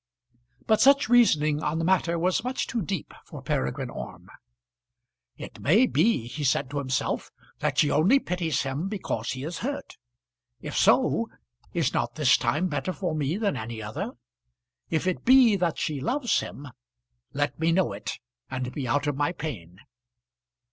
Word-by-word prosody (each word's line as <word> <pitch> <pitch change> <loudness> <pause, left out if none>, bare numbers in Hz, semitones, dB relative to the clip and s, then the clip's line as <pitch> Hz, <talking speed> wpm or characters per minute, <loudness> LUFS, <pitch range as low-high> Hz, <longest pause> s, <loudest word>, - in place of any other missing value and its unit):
But 220 - +3
such 275 -3 +5
reasoning 155 -11 +4
on 150 +1 -1
the 165 - -1
matter 175 -2 +2
was 180 +5 +1
much 255 +1 -2
too 235 - -2
deep 185 -3 -4
for - - -10
Peregrine 65 +1 -2
Orme. - - -8 1.1
"It - - -9
may 210 - +4
be," 225 - +2
he 125 +5 -6
said 135 0 +1
to 145 - -2
himself, 130 -2 -2 0.3
"that - - -1
she 150 - +4
only 180 - +5
pities 175 - -1
him 140 +6 -3
because 190 - -3
he 130 +1 -6
is 165 +3 -5
hurt. 280 +4 -5 0.6
If - - -7
so, - - +3 0.4
is - - 0
not - - -1
this - - +4
time 165 +6 0
better 145 +2 -2
for 180 -3 -3
me 155 +3 -1
than 205 -2 0
any 110 +1 -5
other? 105 0 -5 0.8
If 165 +1 0
it 185 -1 -1
be 250 -4 +6
that 175 -3 0
she 145 -3 -2
loves 250 - +1
him, 145 0 -7 0.6
let 145 +2 -2
me 165 +1 +2
know 175 - +2
it, 100 - -5 0.3
and 125 -1 -3
be 135 -4 -4
out 145 +4 +1
of 145 -2 0
my 145 +4 0
pain." 110 - -7
160 Hz, 170 wpm, -26 LUFS, 140-190 Hz, 1.1 s, be